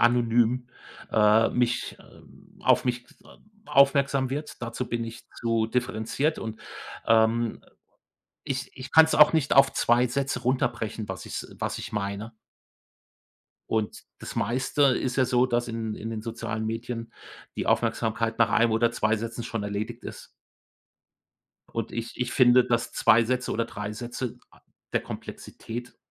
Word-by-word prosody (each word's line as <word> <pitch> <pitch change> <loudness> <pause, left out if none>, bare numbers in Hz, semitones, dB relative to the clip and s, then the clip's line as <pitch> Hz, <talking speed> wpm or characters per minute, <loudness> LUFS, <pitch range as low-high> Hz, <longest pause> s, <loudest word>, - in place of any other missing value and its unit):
anonym, 120 +1 +3 0.5
äh, 110 +1 +5
mich 120 0 0
ähm, - - -19
auf - - +4
mich, 120 -1 -1 0.2
ähm, 210 - -19 0.2
aufmerksam 140 -2 +3
wird. 145 -1 -5
Dazu 120 +1 -4
bin 120 -1 -2
ich 115 +1 -9
zu 115 -1 +1
differenziert 125 +5 -1
und, 110 -1 -6 0.5
ähm, 115 0 +2 0.8
ich 130 -2 -3
ich 130 -1 -9
kann's 160 0 +7
auch 150 +1 +7
nicht 145 -4 +1
auf 135 0 +6
2 120 +1 +3
Sätze 135 0 -2
runterbrechen, 120 -4 -1
was 95 -1 -6
ich - - -7
s - - -13
was - - -2
ich - - -7
meine. 100 +2 -3 1.4
Und 110 -2 -2 0.2
das - - -8
Meiste 130 +6 -1
ist 130 -1 +2
ja 130 - +4
so, 125 0 +3
dass 120 -1 0
in 115 -1 -3
in 115 - -6
den 110 -1 -4
sozialen 110 -1 -4
Medien 115 +1 -4 0.5
die - - -2
Aufmerksamkeit 115 0 0
nach 115 -2 +5
1 115 +2 +3
oder 115 +1 +2
2 110 -1 +1
Sätzen 115 +2 -5
schon 115 -1 -4
erledigt 105 +4 -4
ist. - - -9 1.4
Und 115 -1 -3
ich 115 0 -5
ich 125 -1 -1
finde, 125 -1 +6
dass 115 -1 0
2 115 +2 +5
Sätze 125 +1 -1
oder 115 - 0
3 105 -2 -6
Sätze 120 +2 -5
a - - -22 0.3
der - - +2
Komplexität 120 +2 -8
120 Hz, 150 wpm, -26 LUFS, 110-125 Hz, 1.4 s, kann's